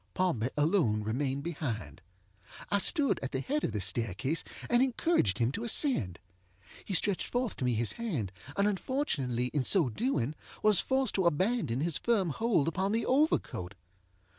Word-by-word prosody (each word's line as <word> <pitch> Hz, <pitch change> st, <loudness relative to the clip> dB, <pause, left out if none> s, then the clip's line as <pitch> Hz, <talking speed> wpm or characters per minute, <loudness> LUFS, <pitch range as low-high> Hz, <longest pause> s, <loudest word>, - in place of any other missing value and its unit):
Pompey 130 Hz, -11 st, 0 dB
alone 145 Hz, -, +2 dB
remained 135 Hz, +5 st, -2 dB
behind. 140 Hz, -, -4 dB, 0.7 s
I 200 Hz, -, +3 dB
stood 285 Hz, -, +2 dB
at 135 Hz, -, -5 dB
the 130 Hz, -, 0 dB
head 290 Hz, -, -2 dB
of -, -, 0 dB
the 105 Hz, -1 st, -3 dB
staircase, 115 Hz, -, 0 dB, 0.2 s
and 240 Hz, 0 st, +3 dB
encouraged 260 Hz, -, +1 dB
him 120 Hz, +1 st, +1 dB
to 220 Hz, -, -5 dB
ascend. 230 Hz, -, +1 dB, 0.7 s
He 195 Hz, -, -3 dB
stretched 195 Hz, +1 st, +1 dB
forth 245 Hz, -3 st, -2 dB
to 130 Hz, -, -2 dB
me 125 Hz, -2 st, +1 dB
his 115 Hz, 0 st, +2 dB
hand, 160 Hz, -, -3 dB, 0.3 s
and 200 Hz, +1 st, +3 dB
unfortunately 145 Hz, -, -1 dB
in 145 Hz, -, +1 dB
so 165 Hz, -3 st, +3 dB
doing 150 Hz, -, -1 dB, 0.3 s
was 210 Hz, -3 st, +5 dB
forced 265 Hz, -3 st, +1 dB
to 190 Hz, -3 st, +2 dB
abandon 170 Hz, -, 0 dB
his 165 Hz, -1 st, +1 dB
firm 205 Hz, -8 st, +1 dB
hold 205 Hz, -5 st, +1 dB
upon 190 Hz, +4 st, 0 dB
the 230 Hz, -, 0 dB
overcoat. 255 Hz, -, 0 dB
165 Hz, 165 wpm, -30 LUFS, -, 0.7 s, was